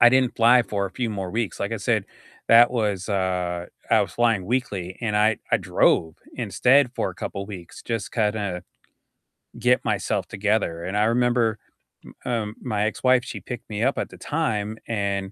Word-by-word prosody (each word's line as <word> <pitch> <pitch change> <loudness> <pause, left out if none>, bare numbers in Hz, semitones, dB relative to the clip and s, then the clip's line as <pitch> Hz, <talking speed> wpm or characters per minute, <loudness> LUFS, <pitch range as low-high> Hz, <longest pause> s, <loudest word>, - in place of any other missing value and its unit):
I 120 - +9
didn't 130 -1 +2
fly 120 +2 +6
for 100 -3 -2
a 95 - -8
few 115 +3 -3
more 95 -3 -4
weeks. 115 -2 -3
Like 100 +3 -2
I 115 - -1
said, 110 -1 0 0.4
that 120 +1 +7
was, 105 -5 -1
uh 90 -3 -1 0.2
I - - +5
was - - -2
flying 115 -6 +1
weekly, 100 -7 -2
and 105 -3 -1
I 110 +1 +3
I - - +5
drove 80 -1 +2 0.2
instead 130 0 +3
for - - -1
a - - -12
couple 100 0 -5
weeks 90 -5 -10
just 115 -3 -3
to - - -12
kinda 105 -5 -1 1.0
get 125 0 +2
myself - - -1
together. 100 -5 -1
And 95 +3 -3
I 105 - +3
remember, 120 -1 +2 0.5
m - - -12
um, 110 -3 -2
my 105 -4 -1
ex-wife, 125 +3 +2
she - - -6
picked 125 -3 -8
me 105 +2 -2
up 135 - +1
at - - -2
the - - -13
time 110 -9 -2
and, 100 -3 -2
110 Hz, 190 wpm, -24 LUFS, 100-120 Hz, 1.0 s, I